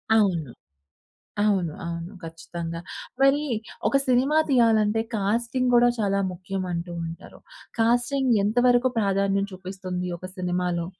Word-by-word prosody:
అవును. 175 Hz, -, +2 dB, 0.9 s
అవును, 190 Hz, -6 st, +1 dB
అవును. 170 Hz, +3 st, -5 dB
ఖచ్చితంగా. 165 Hz, 0 st, -6 dB, 0.4 s
మరి 275 Hz, +2 st, +4 dB, 0.5 s
ఒక 275 Hz, -, +2 dB
సినిమా 260 Hz, +4 st, +3 dB
తీయాలంటే, 225 Hz, -4 st, +3 dB
కాస్టింగ్ 235 Hz, +5 st, 0 dB
కూడా 240 Hz, 0 st, +6 dB
చాలా 200 Hz, -2 st, +1 dB
ముఖ్యం 185 Hz, +2 st, -5 dB
అంటూ 170 Hz, +1 st, -4 dB
ఉంటారు. 165 Hz, +1 st, -10 dB, 0.4 s
కాస్టింగ్ 245 Hz, +3 st, +2 dB
ఎంతవరకు 245 Hz, +3 st, +3 dB
ప్రాధాన్యం 195 Hz, -1 st, +1 dB
చూపిస్తుంది 185 Hz, -1 st, -5 dB
ఒక 185 Hz, -, -7 dB
సినిమాలో? 180 Hz, -1 st, -1 dB
200 Hz, 110 wpm, -25 LUFS, 180-240 Hz, 0.9 s, కూడా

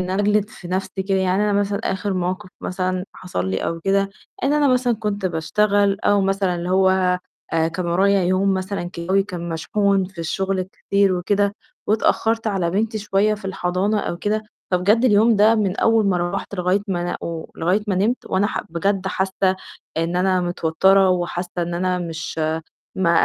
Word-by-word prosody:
إن 185 Hz, 0 st, -3 dB
أنا 195 Hz, +2 st, +1 dB
أجلِد 210 Hz, 0 st, +2 dB
في 175 Hz, -, -11 dB
نفسي 190 Hz, +1 st, -2 dB
كده، 195 Hz, -, +2 dB
يعني 190 Hz, +2 st, +1 dB
أنا 210 Hz, -, +1 dB
مثلًا 200 Hz, 0 st, +1 dB
آخر 190 Hz, +1 st, -1 dB
موقف 185 Hz, 0 st, -2 dB
مثلًا 185 Hz, 0 st, -2 dB
حصل 95 Hz, -, -4 dB
لي 95 Hz, -, 0 dB
أو 165 Hz, 0 st, -3 dB
كده 195 Hz, +2 st, +1 dB, 0.3 s
إن 275 Hz, -, +2 dB
أنا 295 Hz, -1 st, +3 dB
مثلًا 250 Hz, -1 st, +2 dB
كنت 205 Hz, -3 st, -2 dB
باشتغل 200 Hz, +4 st, +1 dB
أو 205 Hz, -1 st, +3 dB
مثلًا 195 Hz, -1 st, +1 dB
اللي 175 Hz, +1 st, -3 dB
هو 190 Hz, 0 st, +4 dB, 0.6 s
آآ، 165 Hz, 0 st, +2 dB
كان 175 Hz, +2 st, -4 dB
ورايا 195 Hz, +3 st, +3 dB
يوم 190 Hz, +2 st, +2 dB
مثلًا 190 Hz, -1 st, -3 dB
جوّي 190 Hz, +4 st, +2 dB
كان 180 Hz, -3 st, -6 dB
مشحون 195 Hz, +4 st, +1 dB
في 185 Hz, -1 st, -12 dB
الشغل 190 Hz, +3 st, -1 dB
كتير 200 Hz, +1 st, 0 dB
وكده، 200 Hz, +3 st, +1 dB, 0.3 s
واتأخرت 225 Hz, +1 st, +1 dB
على 190 Hz, -5 st, 0 dB
بنتي 215 Hz, +3 st, -1 dB
شوية 210 Hz, +1 st, +1 dB
في 210 Hz, -, -13 dB
الحضانة 190 Hz, +2 st, 0 dB
أو 170 Hz, -, -3 dB
كده، 215 Hz, +4 st, -1 dB, 0.3 s
فبجد 205 Hz, +7 st, +3 dB
اليوم 220 Hz, -1 st, +5 dB
ده، 215 Hz, +2 st, +5 dB
من 205 Hz, -4 st, 0 dB
أول 225 Hz, -2 st, +3 dB
ما 185 Hz, -2 st, +2 dB
روَّحت 175 Hz, +3 st, -3 dB
لغاية 180 Hz, +1 st, +1 dB
ما 180 Hz, -2 st, -1 dB
أنا 175 Hz, -, -2 dB
و 165 Hz, -1 st, -5 dB
لغاية 185 Hz, +6 st, +1 dB
ما 200 Hz, -, 0 dB
نِمت، 215 Hz, +7 st, 0 dB
وأنا 195 Hz, +2 st, +1 dB
ح -, -, -3 dB
بجد 190 Hz, +3 st, 0 dB
حاسة 190 Hz, 0 st, 0 dB, 0.4 s
إن 165 Hz, +2 st, 0 dB
أنا 185 Hz, 0 st, +2 dB
متوترة، 180 Hz, +3 st, +3 dB
وحاسة 175 Hz, 0 st, -2 dB
إن 175 Hz, 0 st, -1 dB
أنا 180 Hz, +1 st, 0 dB
مش 165 Hz, -2 st, -5 dB, 0.6 s
ما 185 Hz, -3 st, +2 dB
190 Hz, 185 wpm, -21 LUFS, 180-205 Hz, 0.6 s, اليوم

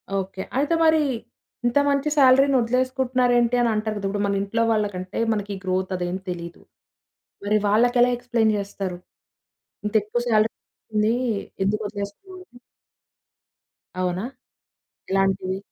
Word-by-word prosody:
Okay. 190 Hz, 0 st, -3 dB, 0.2 s
అయితే 290 Hz, +4 st, +1 dB
మరీ, 315 Hz, -1 st, +5 dB, 0.6 s
ఇంత 240 Hz, +3 st, +2 dB
మంచి 280 Hz, +1 st, +1 dB
సాలరీ‌ని 270 Hz, 0 st, +6 dB
వదిలేసుకుంటున్నారేంటి 250 Hz, 0 st, +1 dB
అనంటారు 215 Hz, -2 st, 0 dB
కదా! 200 Hz, -, -4 dB
ఇప్పుడు 205 Hz, 0 st, -2 dB
మన 200 Hz, 0 st, 0 dB
ఇంట్లో 215 Hz, +3 st, -1 dB
వాళ్ళకు 210 Hz, -3 st, 0 dB
అంటే 185 Hz, 0 st, -5 dB
మనకి 205 Hz, -1 st, -3 dB
గ్రోత్ 185 Hz, 0 st, -1 dB
అదేం 180 Hz, 0 st, -2 dB
తెలీదు. 170 Hz, -1 st, -6 dB, 0.8 s
మరి 210 Hz, +1 st, +3 dB
వాళ్ళకెలా 245 Hz, +4 st, +4 dB
ఎక్స్‌ప్లెయిన్ 235 Hz, -3 st, +1 dB
జేస్తరు? 195 Hz, -3 st, -4 dB, 0.9 s
ఇంతేక్కువ 215 Hz, +2 st, 0 dB
సాలరీ 215 Hz, -1 st, +3 dB
వస్తుంది. 215 Hz, +1 st, -2 dB, 0.5 s
ఎందుకు 210 Hz, +3 st, 0 dB
వదిలేసుకోడం? 205 Hz, -, -8 dB, 1.6 s
అవునా? 180 Hz, +3 st, -1 dB, 0.9 s
ఎలాంటివి? 195 Hz, -1 st, +1 dB
215 Hz, 110 wpm, -23 LUFS, 195-245 Hz, 1.6 s, సాలరీ‌ని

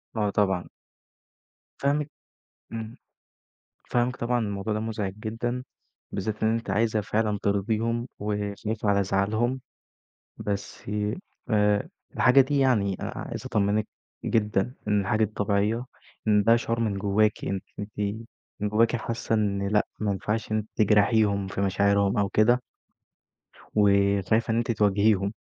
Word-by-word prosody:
آه 105 Hz, -2 st, +1 dB
طبعًا. 95 Hz, -3 st, +1 dB, 1.1 s
فاهمِك 145 Hz, +1 st, +1 dB, 0.6 s
إمم، 115 Hz, +1 st, -6 dB, 0.9 s
فاهمِك 125 Hz, +1 st, +1 dB
طبعًا، 120 Hz, +1 st, 0 dB
الموضوع 100 Hz, -1 st, -2 dB
ده 105 Hz, -, -1 dB
مزعج 105 Hz, -3 st, -3 dB
جدًا، 120 Hz, +3 st, -3 dB, 0.5 s
بالذات 105 Hz, +2 st, -3 dB
إن 110 Hz, 0 st, +3 dB
أنتِ 115 Hz, -3 st, -3 dB
عايزة 110 Hz, +2 st, +2 dB
فعلًا 105 Hz, +1 st, 0 dB
ترضيهم 110 Hz, +4 st, 0 dB
وخايفة 105 Hz, +1 st, -3 dB
على 100 Hz, -1 st, +3 dB
زعلهم، 110 Hz, +7 st, 0 dB, 0.8 s
بس 100 Hz, -1 st, -4 dB, 0.7 s
آآ، 105 Hz, -1 st, +2 dB, 0.3 s
الحاجة 130 Hz, +2 st, +6 dB
دي 140 Hz, +2 st, 0 dB
يعني 105 Hz, -8 st, +2 dB
عايز -, -, -5 dB
أطمنِك 105 Hz, +1 st, +1 dB, 0.4 s
جدًا 105 Hz, +1 st, +1 dB
إن 105 Hz, -1 st, +3 dB
الحاجة 110 Hz, +3 st, +1 dB
دي 110 Hz, -, -1 dB
طبيعية، 105 Hz, +4 st, 0 dB, 0.4 s
إن 105 Hz, -1 st, +4 dB
ده 115 Hz, +1 st, +6 dB
شعور 115 Hz, 0 st, -1 dB
من 110 Hz, -4 st, 0 dB
جواكِ 105 Hz, +2 st, +1 dB
أن 95 Hz, -1 st, -1 dB, 0.2 s
أنتِ 105 Hz, 0 st, -7 dB, 0.6 s
من 105 Hz, -, -1 dB
جواكِ 115 Hz, +3 st, +3 dB
حاسة 115 Hz, 0 st, -2 dB
إن 100 Hz, -2 st, 0 dB
لأ 105 Hz, +1 st, +2 dB
ما 105 Hz, -1 st, 0 dB
ينفعش 105 Hz, +3 st, -2 dB
إن 110 Hz, -, +2 dB
أنتِ 110 Hz, 0 st, -3 dB
تجرحيهم 105 Hz, -1 st, +3 dB
في 95 Hz, 0 st, -3 dB
مشاعرهم 100 Hz, 0 st, +2 dB
أو 100 Hz, -1 st, +2 dB
كده. 120 Hz, +5 st, +3 dB, 1.1 s
وشايف 100 Hz, +2 st, +3 dB
إن 115 Hz, -, +2 dB
أنتِ 120 Hz, 0 st, 0 dB
تواجهيهم، 100 Hz, -1 st, +2 dB
105 Hz, 130 wpm, -26 LUFS, 100-115 Hz, 1.1 s, الحاجة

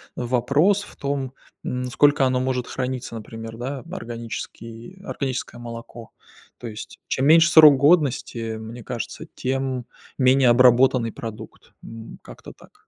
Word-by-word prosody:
вопрос 140 Hz, +11 st, +1 dB
в -, -, -14 dB
том, 140 Hz, -2 st, -3 dB, 0.3 s
м, 125 Hz, 0 st, -3 dB
сколько 145 Hz, +2 st, +3 dB
оно 130 Hz, 0 st, 0 dB
может 130 Hz, -1 st, -2 dB
храниться, 125 Hz, -2 st, -4 dB
например, 115 Hz, 0 st, -8 dB
да, 135 Hz, +3 st, -5 dB
органический 115 Hz, +3 st, -8 dB
органическое 130 Hz, -6 st, -4 dB
молоко. 115 Hz, -1 st, -10 dB, 0.5 s
То 120 Hz, -, -7 dB
есть. 105 Hz, -1 st, -9 dB
Чем 130 Hz, -, -1 dB
меньше 165 Hz, +2 st, +6 dB
срок 155 Hz, -4 st, +9 dB
годности, 145 Hz, -4 st, +2 dB, 0.2 s
э, -, -, -7 dB
мне 115 Hz, +1 st, -9 dB
кажется, 120 Hz, 0 st, -6 dB
тем 130 Hz, -1 st, -2 dB, 0.3 s
менее 130 Hz, 0 st, +4 dB
обработанный 125 Hz, -1 st, +4 dB
продукт. 115 Hz, -2 st, -10 dB
М, 115 Hz, 0 st, -10 dB
как-то -, -, -12 dB
так. -, -, -22 dB
125 Hz, 135 wpm, -23 LUFS, 115-135 Hz, 0.5 s, срок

